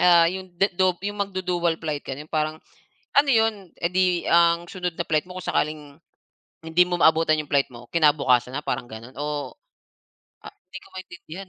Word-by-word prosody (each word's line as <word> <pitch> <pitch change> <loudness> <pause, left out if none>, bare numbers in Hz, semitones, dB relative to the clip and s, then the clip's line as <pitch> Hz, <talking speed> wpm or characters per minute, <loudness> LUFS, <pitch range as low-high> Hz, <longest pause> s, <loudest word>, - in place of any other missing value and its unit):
ah, 170 -2 +6
yung 185 -1 -8
dedu 185 0 +2
yung 205 +1 -4
magdudual 180 -3 -1
flight, 155 -3 -3
gano'n, 145 +3 -7
parang 155 0 -1 0.6
ano 285 0 +5
'yon, 220 -6 +1
eh 170 - +1
di 180 -1 +2
ang 170 0 +3
sunod 180 -2 -4
na 170 +1 -4
flight 155 0 +1
mo 180 0 -10
kung - - -5
sakaling 155 0 0 0.8
hindi 160 +2 +3
mo 180 - -2
maabutan 160 -1 +4
yung 150 - -8
flight 140 -1 +2
mo, 120 0 -12
kinabukasan 140 -6 +3
na, 145 - -3
parang 120 - -3
gano? 115 0 -10
Oo. 145 0 -4 0.9
Ah, - - -9 0.2
hindi - - -8
ko - - -17
maintindihan 185 0 -10
170 Hz, 180 wpm, -24 LUFS, 150-185 Hz, 0.9 s, ah